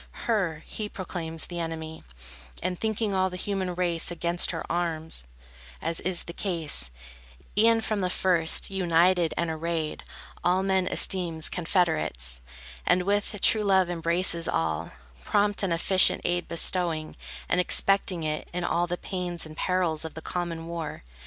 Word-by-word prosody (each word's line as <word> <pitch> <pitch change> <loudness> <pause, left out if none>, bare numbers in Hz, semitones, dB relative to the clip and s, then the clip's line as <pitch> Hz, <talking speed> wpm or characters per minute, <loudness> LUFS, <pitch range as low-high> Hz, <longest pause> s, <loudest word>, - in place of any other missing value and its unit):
Her 180 -9 0
he 210 -1 -5
proclaims 165 -4 -3
the 175 -1 -6
enemy, 160 -1 -5 0.6
And 180 0 -2
thinking 220 -1 -1
all 190 0 +2
the 180 - -7
human 190 -2 -2
race 175 -2 +1
Against 175 0 +1
her - - -3
armed, 165 - -2 0.6
as 165 +1 -2
is 180 -1 +1
the 170 - -8
case, 165 - -3 0.7
E'en 225 +2 +5
from 215 -2 -1
the 180 - 0
first, 180 -1 +3
united 175 -2 +3
and 170 -1 0
arrayed, 160 -1 -3 0.4
All 180 +2 +2
men 190 -1 +1
esteems 170 -5 +2
confederates, 155 - 0 0.4
And 180 0 +3
with 205 +2 0
true 220 - +6
love 190 -3 +3
embraces 170 0 +1
all, 80 0 -1 0.3
Prompt 205 - +2
and 195 -3 0
efficient 185 +3 +4
aid 175 0 0
bestowing, 170 -2 +1 0.3
and 180 - +3
Expecting 185 -2 +3
it, 155 0 -2
in 180 0 -3
all 175 0 +1
the 175 +1 -2
pains 180 -3 -3
And 155 0 -10
perils 175 -3 0
of 160 - -5
the 160 - -6
common 170 -2 -3
war. 165 - -5
175 Hz, 150 wpm, -27 LUFS, 165-185 Hz, 0.7 s, true